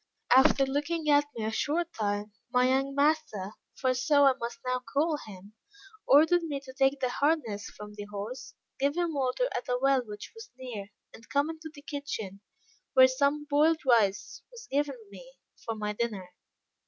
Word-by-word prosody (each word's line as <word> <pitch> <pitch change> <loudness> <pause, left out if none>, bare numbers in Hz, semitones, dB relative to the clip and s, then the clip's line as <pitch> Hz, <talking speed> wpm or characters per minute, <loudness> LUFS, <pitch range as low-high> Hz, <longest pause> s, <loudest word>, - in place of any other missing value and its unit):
After 270 +1 +5
looking 295 +3 -1
at 290 0 +5
me 220 - -2
a 220 - -1
short 310 +8 -1
time, 205 -1 -2 0.2
my 250 0 +3
young 270 +1 +1
master 285 -9 +1 0.2
(for 260 -2 +1
so 285 +3 +3
I 270 - +6
must 235 0 -4
now 255 0 0
call 295 +5 0
him) 200 0 -12 0.5
ordered 320 +5 +6
me 300 -4 -3
to 265 -2 -12
take 270 +1 +2
the 255 - 0
harness 245 -7 0
from 210 0 -9
the 205 0 -7
horse, 205 +5 -7 0.2
give 285 +4 +1
him 345 -2 0
water 275 - 0
at 245 - -4
a 250 - +1
well 270 0 +3
which 210 -2 -9
was 450 0 -11
near, 240 -6 -7 0.3
and 225 - -15
come 285 +3 +1
into 320 0 -9
the 285 -1 -14
kitchen, 225 -10 -6 0.5
where 260 0 +9
some 280 +3 0
boiled 310 +2 +3
rice 220 -6 +2
was 470 -3 -12
given 280 -1 0
me 260 +7 -13 0.3
for 225 - -3
my 210 -1 -3
dinner. 205 -5 -4
265 Hz, 180 wpm, -29 LUFS, 220-290 Hz, 0.5 s, where